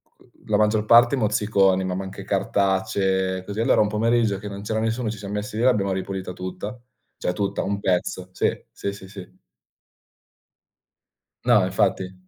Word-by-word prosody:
c - - -47
uhm, - - -24 0.2
la - - +3
maggior 105 0 +2
parte 120 +4 +6
mozziconi, 100 -4 +2
ma 95 -1 -2
ma 95 - -3
anche 95 - -8
cartacce, 95 -1 0
così. 105 +2 -5
Allora, 115 - +4
un 105 - +3
pomeriggio 110 -1 +1
che 105 +2 -8
non 100 0 -7
c'era 110 +1 -1
nessuno, 115 +1 -1
ci 110 - -5
siam 100 0 -7
messi 105 +1 -4
lì 115 - 0
e - - +4
l'abbiamo 105 -6 +3
ripulita 95 0 -4
tutta. 95 +6 -6 0.4
Cioè, 90 - -1
tutta, 100 0 -2
un 100 +1 -2
pezzo. 90 -1 -1
Sì, - - +2 0.2
sì, 100 - -4
sì, 95 -1 -11
sì. 100 -2 -11 2.1
No, - - +5
infatti. 95 0 0
100 Hz, 175 wpm, -23 LUFS, 95-105 Hz, 2.1 s, parte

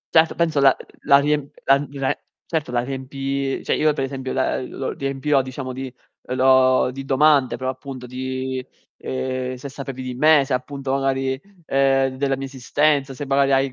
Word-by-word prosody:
Certo, 160 0 +5
penso 160 -3 +1
la 135 -1 +6
uhm, - - -14
la 140 - +7
riemp 145 0 0
la 135 - +6
n 145 - -5
la 135 -1 0 0.3
certo 155 -6 -2
la 120 -1 +1
riempi 135 +1 -3
cioè - - 0
io, 155 0 +3
per 140 - -2
esempio, 135 -1 -4
la 130 - 0
uhm, 125 - -6
lo 135 - -4
riempirò 135 +1 0
diciamo 130 0 -6
di 130 0 -6 0.4
uhm, 125 - -2
lo 130 0 +4
di 135 +1 -7
domande, 135 -2 +3
però 130 +1 -2
appunto 130 -1 -9
di 130 +1 -4 0.3
ehm, 130 0 -3
se 130 +3 -8
sapevi 135 -1 -7
di 130 - -4
me, 150 +2 +5
se 130 - -2
appunto 135 +1 -3
magari 135 -1 0
uhm, 135 -8 +1
della 135 0 +1
mia 135 - -4
esistenza, 135 +1 0
se 145 - -5
magari 135 0 +2
hai 135 0 +2
135 Hz, 190 wpm, -22 LUFS, 130-140 Hz, 0.4 s, la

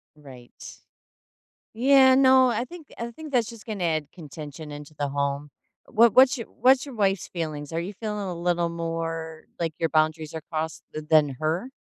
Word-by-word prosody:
Right. 130 -5 -13 0.9
Yeah, 260 +2 +6
no, 260 -1 +6
I 235 +2 -1
think 340 -2 -12
I 235 0 -4
think 305 +4 -10
that's 240 -2 +2
just 230 -2 -12
gonna 210 -5 -4
add 155 -3 -1
contention 150 -2 -9
into 145 +1 -9
the 145 -1 -3
home. 140 +1 -2 0.4
What 230 0 +4
what's 260 +2 +6
your 230 - -6
what's 260 +2 +3
your 270 -4 -9
wife's 195 -3 +1
feelings? 155 -4 -5
Are 165 - 0
you 190 +4 -5
feeling 210 0 -4
a 180 - -4
little 170 -1 0
more 165 -1 -4
like 165 -2 -1
your 165 - +1
boundaries 155 0 0
are 160 - -4
crossed 160 0 -3
th 155 0 -6
than 155 -2 +5
her? 170 +11 -1
170 Hz, 180 wpm, -25 LUFS, 155-235 Hz, 0.9 s, Yeah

